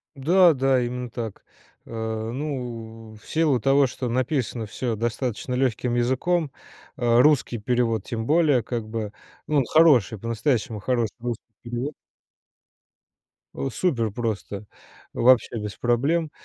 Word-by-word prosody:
Да 170 +5 +5
да, 135 -1 +2
именно 125 0 -3
так. 115 -4 -6 0.4
Э, 110 -1 -4
ну, 120 -5 -6
в 105 - -18
силу 155 -6 +2
того, 135 +3 +4
что 125 0 -4
написано 125 -2 -1
всё 115 +1 -3
достаточно 120 +2 -2
легким 125 -1 0
языком, 140 +6 +1 0.5
а, 120 -1 +3
русский 140 -5 +3
перевод 115 0 0
тем 115 -2 -4
более 150 -5 +4
как 115 -1 -4
бы. 110 -2 -4 0.4
Ну, 150 - +1
он 135 - +3
хороший, 130 - +4
по-настоящему 115 -1 -1
хороший 115 -1 -1
русский 120 -1 -4 0.2
перевод. 120 +5 -4 1.8
Супер 115 - 0
просто. 105 -3 -4 0.5
Вообще 120 -1 +4
без 105 -1 -5
проблем. 145 +7 +1
120 Hz, 125 wpm, -24 LUFS, 115-135 Hz, 1.8 s, Да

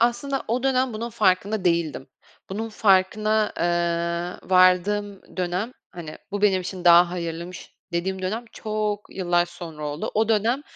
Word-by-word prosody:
aslında 240 +4 +1
o 245 +3 0
dönem 260 -1 +1
bunun 230 +2 -4
farkında 200 -1 +1
değildim. 170 -6 0 0.4
Bunun 220 +4 -3
farkına, 215 +1 +2
eee, 170 +1 -1
vardığım 190 +3 +2
dönem, 185 +6 -2 0.2
hani, 165 -3 -9
bu 205 0 -3
benim 190 -3 +4
için 180 0 -6
daha 175 0 +7
hayırlıymış 170 0 -6 0.2
dediğim 185 +2 -2
dönem 220 +6 -2
çok 210 -1 -3
yıllar 175 -2 +2
sonra 165 -3 -8
oldu. 145 +2 -4
O 220 +1 +2
dönem 230 +5 +2
190 Hz, 140 wpm, -24 LUFS, 175-215 Hz, 0.4 s, daha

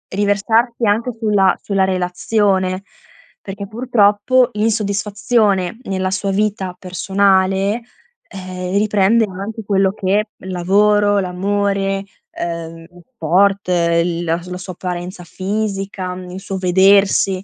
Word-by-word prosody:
riversarsi 220 +4 +1
anche 220 +4 +1
sulla 205 -4 +2
sulla 195 -2 0
relazione, 185 +1 0 0.6
perché, 200 0 -7
purtroppo, 230 +1 +2
l'insoddisfazione 210 -1 0
nella 190 -3 -2
sua 195 0 -1
vita 195 -2 -1
personale, 195 +3 +1 0.5
eh, 185 -1 -4
riprende 210 +2 +3
anche 200 +4 -7
quello 195 -1 +2
che 205 +2 0
il 190 - -8
lavoro, 205 +3 +3
l'amore, 195 +1 -1 0.3
ehm, 165 -1 -6 0.3
sport, 195 +3 +2
l 170 -1 +1
la 165 0 0
la 180 0 -6
sua 185 0 -7
apparenza 180 0 -6
fisica, 195 0 -3
mhmm, 180 0 -9
il 185 - -7
suo 195 0 -5
vedersi, 190 +1 +3
195 Hz, 110 wpm, -18 LUFS, 185-205 Hz, 0.6 s, riprende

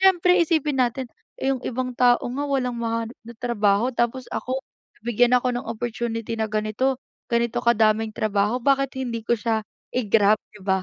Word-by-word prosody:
siyempre 365 -1 +5
isipin 305 -4 +1
natin, 250 +1 0 0.3
eh, 270 - +1
yung 255 - -7
ibang 255 0 -2
tao 245 -1 +5
nga 260 +4 -3
walang 255 -3 0
mahanap 230 0 -2
na 235 - -9
trabaho, 225 -1 +2
tapos 240 +2 0
ako 260 +1 -2 0.4
nabigyan 240 +2 +3
ako 250 0 +1
ng 245 - -4
opportunity 230 0 -3
na 220 - +1
ganito, 215 +5 0 0.3
ganito 235 0 +1
kadaming 220 -1 +3
trabaho 215 +2 +1
bakit 275 -1 +2
hindi 235 -3 -3
ko 235 - +3
siya 220 0 0 0.3
i-grab 215 -3 +3 0.2
di 200 - -14
ba? 190 -1 +1
240 Hz, 165 wpm, -24 LUFS, 220-255 Hz, 0.4 s, siyempre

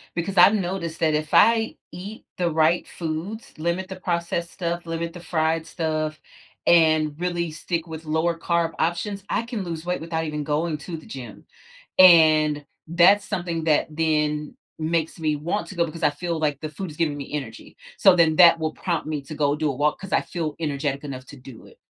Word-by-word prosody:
because 180 +3 -3
I've 200 - +8
noticed 175 -4 -3
that 155 -1 +2
if 155 0 -3
I 225 0 +4 0.2
eat 200 +5 -9
the 175 -2 0
right 160 +2 +2
foods, 170 +7 -5
limit 170 +4 -2
the 190 - -7
processed 170 -1 -2
stuff, 170 -1 -3
limit 165 0 -4
the 175 - -9
fried 160 -1 0
stuff, 155 -2 -2 0.5
and 155 -3 +4
really 175 -2 -2
stick 165 +2 -3
with 160 0 -8
lower 160 +2 0
carb 170 -1 0
options, 190 +4 -1
I - - 0
can 230 -4 -4
lose 170 -2 -6
weight 180 0 -2
without 160 0 -3
even 150 -1 -3
going 155 +2 -1
to 165 +3 -6
the 155 - -13
gym. 130 -3 -9 0.5
And, 155 -4 +6 0.2
that's 180 +4 +5
something 170 -5 -3
that 155 -2 +3
then 150 -1 -1 0.2
makes 160 +1 -1
me 155 -1 0
want 170 +8 -3
to 190 - -9
go 170 -1 +2
because 165 +1 -8
I - - +5
feel 165 +2 -4
like 145 -2 -1
the 155 - -4
food 180 +4 -6
is 150 - -11
giving 150 -3 -1
me 140 +1 -8
energy, 120 -6 -6 0.2
so 195 -3 +6
then 160 -3 +3
that 170 -2 +8
will 155 0 -1
prompt 170 -5 -3
me 155 -2 -3
to 150 +3 -8
go 145 -1 +1
do 155 -1 0
a 135 - -3
walk, 150 +3 0
'cause 195 0 -7
I - - +4
feel 160 -4 -4
energetic 145 -3 -2
enough 130 -3 -7
to 145 - -12
do 125 -3 -13
it. - - -18
165 Hz, 205 wpm, -24 LUFS, 155-175 Hz, 0.5 s, I've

